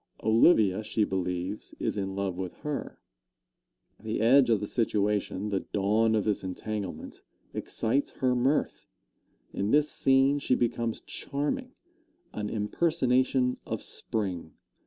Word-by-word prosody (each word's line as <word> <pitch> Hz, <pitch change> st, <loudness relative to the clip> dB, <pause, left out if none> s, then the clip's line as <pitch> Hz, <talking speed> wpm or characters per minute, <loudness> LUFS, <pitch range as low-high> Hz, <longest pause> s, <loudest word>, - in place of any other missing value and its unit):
Olivia, 110 Hz, -, +4 dB
she 110 Hz, 0 st, 0 dB
believes, 90 Hz, +1 st, -3 dB
is -, -, -1 dB
in 95 Hz, -1 st, -3 dB
love 100 Hz, -2 st, -2 dB
with 90 Hz, -1 st, -5 dB
her. 150 Hz, -2 st, -4 dB, 1.0 s
The 110 Hz, 0 st, -3 dB
edge 125 Hz, +3 st, +5 dB
of 110 Hz, -3 st, +3 dB
the 105 Hz, -, -3 dB
situation, 105 Hz, -2 st, 0 dB
the 100 Hz, -2 st, 0 dB
dawn 110 Hz, +4 st, +1 dB
of 105 Hz, -, +1 dB
this 105 Hz, -2 st, -1 dB
entanglement, 100 Hz, +1 st, -5 dB, 0.3 s
excites 135 Hz, +6 st, -1 dB
her 130 Hz, -1 st, 0 dB
mirth. 130 Hz, +4 st, 0 dB, 0.7 s
In 100 Hz, +1 st, -1 dB
this 150 Hz, +4 st, +3 dB
scene 135 Hz, +2 st, +3 dB
she 130 Hz, -, +1 dB
becomes 115 Hz, -1 st, -1 dB
charming 250 Hz, -, -3 dB, 0.6 s
an 105 Hz, -1 st, -3 dB
impersonation 130 Hz, +1 st, +1 dB
of -, -, -4 dB
Spring. 90 Hz, -7 st, -3 dB
110 Hz, 125 wpm, -28 LUFS, 100-130 Hz, 1.0 s, edge